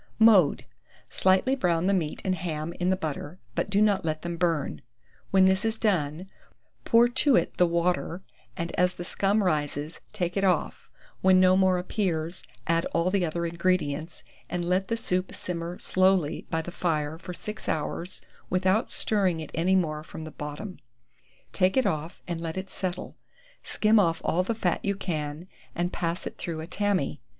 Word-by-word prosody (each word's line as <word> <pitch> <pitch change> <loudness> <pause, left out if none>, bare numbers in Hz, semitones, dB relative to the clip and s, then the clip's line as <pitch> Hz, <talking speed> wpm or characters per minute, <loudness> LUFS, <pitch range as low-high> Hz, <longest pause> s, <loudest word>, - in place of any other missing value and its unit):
Mode. 210 -9 +5 0.4
Slightly 190 +8 +3
brown 175 -8 +1
the 200 - +3
meat 165 -6 -1
and 190 - +2
ham 165 -2 -3
in 180 0 +1
the 190 - +3
butter, 155 -1 -5 0.2
but - - -1
do 200 +1 +4
not 200 -3 +2
let 155 -1 -2
them 170 0 -3
burn. 165 -4 0 0.5
When 190 -1 +5
this 190 0 +3
is 225 0 0
done, 180 -5 0 0.6
pour 235 +1 +6
to 260 +2 +4
it - - +1
the 180 - +5
water, 170 +1 0 0.3
and 170 0 -3
as 180 0 +3
the 175 - -6
scum 200 +4 +1
rises, 150 -2 -1
take 175 -1 -2
it 195 - 0
off; 180 -5 0 0.3
when 185 0 +6
no 185 0 +6
more 190 -1 +4
appears, 180 -3 -2 0.2
add 165 0 +1
all 170 +2 +2
the 195 -2 +2
other 170 +1 -1
ingredients, 170 -2 -1 0.3
and 175 -1 -2
let 185 +2 +1
the 230 - -1
soup 185 -4 -1
simmer 170 0 -4
slowly 185 -4 +1
by 160 0 -1
the 175 - -7
fire 160 -3 -1
for 180 - -8
6 210 +1 -6
hours 170 +4 -3 0.3
without 190 +5 +2
stirring 190 -6 +1
it 155 - -7
any 180 +4 +2
more 155 -5 0
from 160 0 -9
the 155 - -7
bottom; 150 +8 -7 0.7
take 190 +2 +2
it 260 - +4
off, 155 +2 -2
and 170 -2 -3
let 165 +1 -4
it 190 0 -5
settle; 185 -1 -4 0.4
skim 215 0 +3
off 165 -4 +2
all 175 - +2
the 225 +5 -1
fat 180 -5 0
you 200 0 0
can, 155 -3 -4 0.3
and 175 +1 -1
pass 170 +1 -2
it - - -7
through 165 -3 -4
a 160 - -5
tammy. 185 -6 -1
180 Hz, 180 wpm, -27 LUFS, 165-190 Hz, 0.7 s, pour